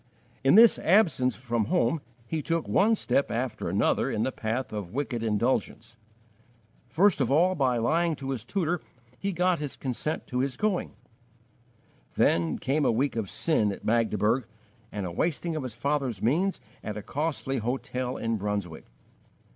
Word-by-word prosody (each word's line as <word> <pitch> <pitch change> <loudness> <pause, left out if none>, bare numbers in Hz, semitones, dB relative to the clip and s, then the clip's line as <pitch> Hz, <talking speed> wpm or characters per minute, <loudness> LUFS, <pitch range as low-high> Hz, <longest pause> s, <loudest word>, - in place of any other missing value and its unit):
In 135 +6 +5
this 230 +1 +7
absence 160 - +3
from 120 -3 -1
home 165 - +1 0.2
he 155 +6 -2
took 165 +2 -1
one 220 +3 +4
step 140 - 0
after 120 0 -2
another - - +1
in 110 0 -1
the 130 - 0
path 115 +1 -3
of 105 -1 -5
wicked 135 -4 -2
indulgence. 115 +1 -1 0.9
First 175 +3 +3
of 125 - +1
all, 175 +6 +4
by 130 -7 +1
lying 160 +8 +1
to 135 -1 -5
his 125 -5 -4
tutor 175 - -1 0.4
he 200 - -1
got 180 0 +1
his 145 -2 -4
consent 135 +4 -3
to 125 - -3
his 130 -1 -1
going; 210 -4 -1 1.2
then 85 -2 +2
came 145 +3 0
a - - +3
week 130 +4 0
of 110 -5 -2
sin 110 -11 +1
at - - -8
Magdeburg 110 +1 +1 0.4
and 100 -2 -4
a 90 - -4
wasting 165 - -1
of 155 - -2
his 125 -4 -6
father's 135 -3 -1
means 160 - +1 0.2
at 105 0 -4
a 105 - -6
costly 145 -2 -2
hotel 125 +2 -3
in 115 0 -1
Brunswick. 100 -5 -4
130 Hz, 165 wpm, -27 LUFS, 115-160 Hz, 1.2 s, this